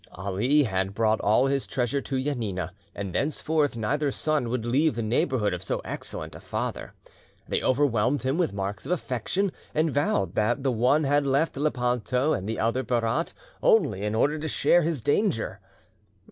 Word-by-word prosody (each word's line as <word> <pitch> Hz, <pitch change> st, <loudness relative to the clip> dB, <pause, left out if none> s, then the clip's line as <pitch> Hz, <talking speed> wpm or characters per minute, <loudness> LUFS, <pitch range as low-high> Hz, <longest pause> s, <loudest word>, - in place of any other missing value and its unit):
Ali 100 Hz, -, +1 dB
had 95 Hz, -4 st, -1 dB
brought 110 Hz, 0 st, +2 dB
all 110 Hz, +5 st, +3 dB
his 135 Hz, 0 st, 0 dB
treasure 130 Hz, +2 st, -1 dB
to 135 Hz, -1 st, -2 dB
Janina, 105 Hz, -, -2 dB, 0.2 s
and 100 Hz, -3 st, -5 dB
thenceforth 150 Hz, -, 0 dB
neither 140 Hz, +7 st, 0 dB
son 145 Hz, -3 st, 0 dB
would 120 Hz, -1 st, -2 dB
leave 135 Hz, +3 st, +2 dB
the 115 Hz, -, -2 dB
neighbourhood 115 Hz, -, +1 dB
of 90 Hz, -, -4 dB
so -, -, -2 dB
excellent -, -, -5 dB
a -, -, -9 dB
father. -, -, -4 dB, 0.5 s
They -, -, 0 dB
overwhelmed 130 Hz, -1 st, +2 dB
him 135 Hz, +6 st, 0 dB
with 175 Hz, -, +1 dB
marks 100 Hz, 0 st, -4 dB
of -, -, -3 dB
affection, 180 Hz, -, -1 dB, 0.2 s
and 155 Hz, -1 st, +2 dB
vowed 160 Hz, +10 st, +1 dB
that 120 Hz, +5 st, +1 dB
the 135 Hz, -, +2 dB
one 125 Hz, +6 st, +3 dB
had 145 Hz, 0 st, +2 dB
left 140 Hz, +4 st, +1 dB
Lepanto, 125 Hz, 0 st, 0 dB
and 95 Hz, +2 st, -3 dB
the 110 Hz, -, -2 dB
other 115 Hz, +4 st, +1 dB
Berat, 120 Hz, +5 st, 0 dB, 0.3 s
only 145 Hz, -, +3 dB
in 105 Hz, +1 st, -1 dB
order 150 Hz, +7 st, +2 dB
to 160 Hz, -, -3 dB
share 175 Hz, +3 st, +3 dB
his 160 Hz, -5 st, -1 dB
danger. 145 Hz, -, 0 dB
130 Hz, 175 wpm, -26 LUFS, 110-150 Hz, 0.5 s, all